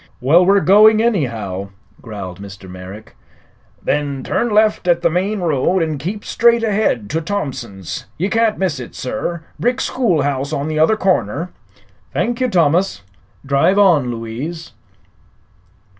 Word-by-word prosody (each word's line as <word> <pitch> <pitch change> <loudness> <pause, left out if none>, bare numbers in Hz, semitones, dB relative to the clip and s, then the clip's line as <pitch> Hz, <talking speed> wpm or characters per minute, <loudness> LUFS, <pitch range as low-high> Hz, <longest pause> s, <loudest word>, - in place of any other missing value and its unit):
"Well, 150 +8 +4
we're 195 +2 +4
going, 215 +3 +6
anyhow," 115 - -1 0.3
growled 100 -5 -8
Mr. 100 -1 -10
Merrick. 95 +4 -11 0.7
"Then 140 -2 -1
turn 240 - -1
left 215 -3 +2
at 170 0 +2
the 170 - +3
main 190 +4 -1
road 165 +2 +1
an' 155 -3 -3
keep 200 +8 -5
straight 235 0 +3
ahead 205 - 0
to 160 +2 -1
Thompson's. 135 - -5
Ye 185 - 0
can't 225 0 +1
miss 180 -8 -1
it, 125 - -9
sir. 165 +6 -4 0.2
Brick 245 +2 0
schoolhouse 145 - 0
on 140 +2 -2
the 155 0 -1
other 190 +8 +4
corner." 180 - 0 0.6
"Thank 240 +1 -1
you, 255 - +2
Thomas. 170 - +1 0.4
Drive 145 +8 +2
on, 170 -11 +4
Louise." 120 +9 -6
165 Hz, 140 wpm, -18 LUFS, 125-200 Hz, 0.7 s, going